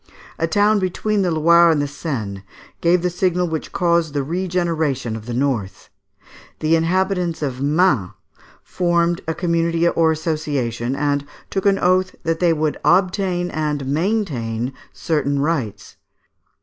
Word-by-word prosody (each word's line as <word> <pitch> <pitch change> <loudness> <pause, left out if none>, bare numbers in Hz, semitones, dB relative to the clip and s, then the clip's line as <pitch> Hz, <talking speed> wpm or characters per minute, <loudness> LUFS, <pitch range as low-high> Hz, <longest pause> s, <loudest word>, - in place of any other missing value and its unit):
A 165 - +1
town 210 +3 +3
between 200 +3 -1
the 185 - +1
Loire 170 +1 +5
and 160 -2 +2
the 145 - 0
Seine 115 - -5 0.4
gave 170 +1 +3
the 180 - +2
signal 180 0 0
which 160 -2 -4
caused 170 -3 +1
the 140 - 0
regeneration 160 -7 -1
of 110 0 -9
the 120 - -4
North. 125 -7 -2 0.7
The 155 +1 +2
inhabitants 175 -1 0
of 130 -2 -3
Mans 145 - +2 0.5
formed 175 -1 0
a 160 - -1
community 170 -1 +1
or 165 -1 +3
association, 145 -7 -2
and 145 0 0 0.3
took 195 +1 0
an 195 -1 +4
oath 185 0 +1
that 165 -1 -1
they 175 -2 +3
would 155 -1 -1
obtain 180 -1 +1
and 150 -3 -2
maintain 135 - -1 0.2
certain 145 -3 -1
rights. 135 -10 -2
165 Hz, 140 wpm, -20 LUFS, 140-180 Hz, 0.7 s, Loire